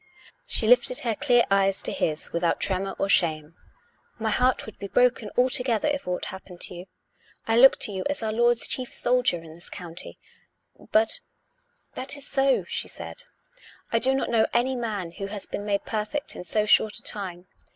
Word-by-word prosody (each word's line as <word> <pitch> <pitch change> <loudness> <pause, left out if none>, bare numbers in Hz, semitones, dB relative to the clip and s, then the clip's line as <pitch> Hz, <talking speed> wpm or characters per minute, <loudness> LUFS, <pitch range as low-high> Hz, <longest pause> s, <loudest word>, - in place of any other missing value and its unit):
She - - +1
lifted - - +5
her 230 -2 0
clear 245 +1 +3
eyes 195 0 +2
to - - -2
his 155 -1 -2
without 170 0 0
tremor 195 0 -1
or 195 - 0
shame. 160 -4 +2 0.3
" 475 - -39
My 220 -1 -1
heart 250 +4 +2
would 220 - -12
be 200 - -5
broken 240 -1 +2
altogether 250 -1 +2
if 285 -5 -2
aught 180 0 -2
happened 185 -2 -11
to - - -2
you. 175 +1 -9 0.6
I 225 - +2
look 270 +2 +8
to - - +3
you 190 -1 -4
as 290 -5 -2
our 220 - -1
Lord's 240 +1 +2
chief 255 -1 -2
soldier 245 -9 +1
in 160 -1 -12
this 170 +2 -12
county." 175 -2 -7 0.4
" - - -24
But 220 +1 +2 0.2
" - - -46
" - - -46
That 265 +2 -3
is 285 - -3
so," 270 -1 +2
she - - -3
said. - - -9 0.3
" - - -23
I 230 - +4
do 265 +3 +3
not 270 - -1
know 225 -2 +3
any 255 +2 +2
man 210 -8 -3
who 195 +3 -6
has 200 -1 -4
been 205 - -6
made 200 -1 -1
perfect 220 +7 -3
in 180 - -8
so 210 +4 0
short 210 0 +4
a - - -8
time. 185 -3 -2
220 Hz, 205 wpm, -25 LUFS, 190-250 Hz, 0.6 s, look